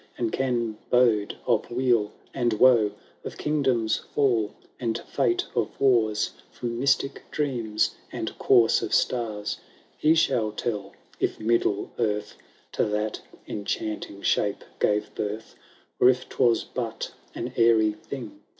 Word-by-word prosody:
And 115 -2 -1
can 120 -4 -1
bode 115 -5 +3
of 115 -4 +1
weal 120 -4 +2 0.2
and 120 -2 +1
woe. 110 -2 +5 0.3
Of - - -7
kingdoms* 130 -7 +1
fall, 120 -7 0 0.2
and 115 -3 -1
fate 365 0 0
of 115 -2 -2
wan, 115 -5 +4 0.3
.From 120 -1 -4
mystic 135 +1 +1
dreams 120 -8 0 0.2
and - - -4
course 115 -2 +5
of - - 0
stars. 110 -4 -1 0.4
He 155 +2 +4
shall 110 -9 +2
tell 105 -3 -3 0.3
if - - -1
middle 110 -2 +1
earth 105 -3 -1 0.4
To - - +1
that 105 0 -2 0.3
enchanting 100 -1 -4
shape 100 -1 +1 0.2
gave 105 0 +1
birth, 105 +2 -4 0.4
Or 125 - +7
if 130 0 +1
Hwas 120 -3 +2
but 115 -3 -4 0.2
an 120 +2 -4
airy 115 -2 +5
thing. 110 0 -8
115 Hz, 130 wpm, -26 LUFS, 105-125 Hz, 0.4 s, Or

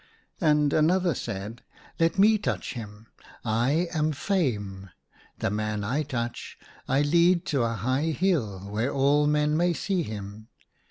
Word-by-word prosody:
And 150 -4 +3
another 175 +2 +3
said. 105 +1 -6 0.4
Let 165 +2 +2
me 215 +2 +5
touch - - -3
him: 110 -3 -9 0.4
I 125 +10 +1
am 155 -1 +1
Fame. 105 - -2 0.5
The - - -1
man 105 0 -2
I 125 +9 0
touch, 120 -5 -4 0.3
I 135 +2 +2
lead 170 +3 +3
to 135 - +2
a 115 -1 0
high 130 - 0
hill 150 - 0
where 115 +6 -1
all 145 +2 +3
men 150 0 +2
may 175 +2 +2
see 185 +2 -1
him. 105 -4 -7
140 Hz, 145 wpm, -26 LUFS, 110-165 Hz, 0.5 s, me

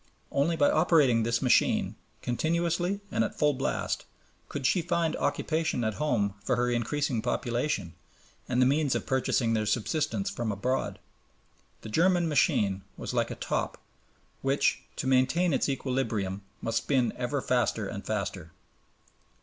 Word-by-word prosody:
Only 150 +5 +2
by 145 -3 +4
operating 155 -8 +4
this 115 +2 0
machine, 125 - +3 0.3
continuously 170 +8 0
and - - +2
at - - -4
full 150 -1 +3
blast, 135 0 -2 0.4
could 140 -2 -4
she 180 - +3
find 165 -1 0
occupation 160 -6 0
at 110 -1 0
home 110 -9 +1
for 125 +4 +1
her 120 +1 +1
increasing 120 +1 0
population 120 - -1 0.6
and 125 0 +1
the 130 - +6
means 145 +1 +2
of - - -2
purchasing 125 -3 +1
their 110 -1 0
subsistence 110 -1 0
from 115 -2 -2
abroad. 125 +6 -1 0.8
The - - -8
German 175 +7 +3
machine 105 -9 +2 0.2
was - - -5
like - - +1
a - - -5
top - - -2 0.6
which 135 +1 +1
to - - -4
maintain 130 +7 +3
its - - +1
equilibrium 120 -8 -1 0.2
must 115 0 0
spin 125 -3 +1
ever 125 +3 -1
faster 120 -4 0
and 100 +1 -6
faster. 95 -6 -4
130 Hz, 145 wpm, -28 LUFS, 115-150 Hz, 0.8 s, the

